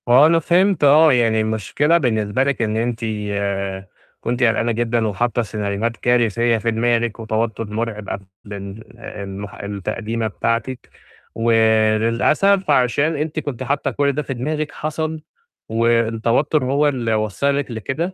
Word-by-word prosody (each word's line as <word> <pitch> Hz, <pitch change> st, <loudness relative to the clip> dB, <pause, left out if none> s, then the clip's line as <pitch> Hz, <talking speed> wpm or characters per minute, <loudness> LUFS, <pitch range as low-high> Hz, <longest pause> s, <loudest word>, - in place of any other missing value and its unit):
هو 130 Hz, +4 st, +7 dB
أنا 165 Hz, +1 st, +4 dB
فهمت 180 Hz, +1 st, +2 dB
آه، 150 Hz, +2 st, +6 dB
يعني 115 Hz, -3 st, +2 dB
المشكلة 110 Hz, +9 st, +1 dB
بالنسبة 110 Hz, -4 st, 0 dB
لِك 140 Hz, -3 st, -1 dB
إن 110 Hz, -1 st, 0 dB
أنتِ 115 Hz, 0 st, -2 dB, 0.3 s
آآ 100 Hz, -1 st, -3 dB, 0.3 s
كنت 120 Hz, +2 st, -1 dB
قلقانة 115 Hz, 0 st, +2 dB
جدًا 115 Hz, 0 st, 0 dB
وحاطّة 120 Hz, +3 st, 0 dB
سيناريوهات 105 Hz, +1 st, -3 dB
كارثية 120 Hz, -1 st, +2 dB
في 115 Hz, +1 st, -1 dB
دماغِك، 115 Hz, 0 st, 0 dB
وتوتر 110 Hz, 0 st, -2 dB
مرعب 110 Hz, -2 st, -4 dB
قبل 100 Hz, +1 st, -5 dB, 0.2 s
ال 100 Hz, +1 st, -9 dB
المح 100 Hz, 0 st, -7 dB
التقديمة 105 Hz, +3 st, -3 dB
بتاعتِك، 115 Hz, +4 st, -3 dB, 0.5 s
وللأسف 115 Hz, -, +2 dB
عشان 140 Hz, +4 st, +2 dB
أنتِ 155 Hz, +1 st, -2 dB
كنتِ 130 Hz, -4 st, -5 dB
حاطّة 140 Hz, +3 st, -1 dB
كُلّ 140 Hz, 0 st, +1 dB
ده 145 Hz, +2 st, -2 dB
في 140 Hz, -, -5 dB
دماغِك 150 Hz, +4 st, -3 dB
حصل، 155 Hz, +1 st, -4 dB, 0.5 s
والتوتر 115 Hz, +5 st, +1 dB
هو 140 Hz, +3 st, +2 dB
اللي 120 Hz, -5 st, -1 dB
وصّلك 130 Hz, +7 st, -1 dB
لكده 135 Hz, -, -3 dB
115 Hz, 135 wpm, -20 LUFS, 110-140 Hz, 0.5 s, هو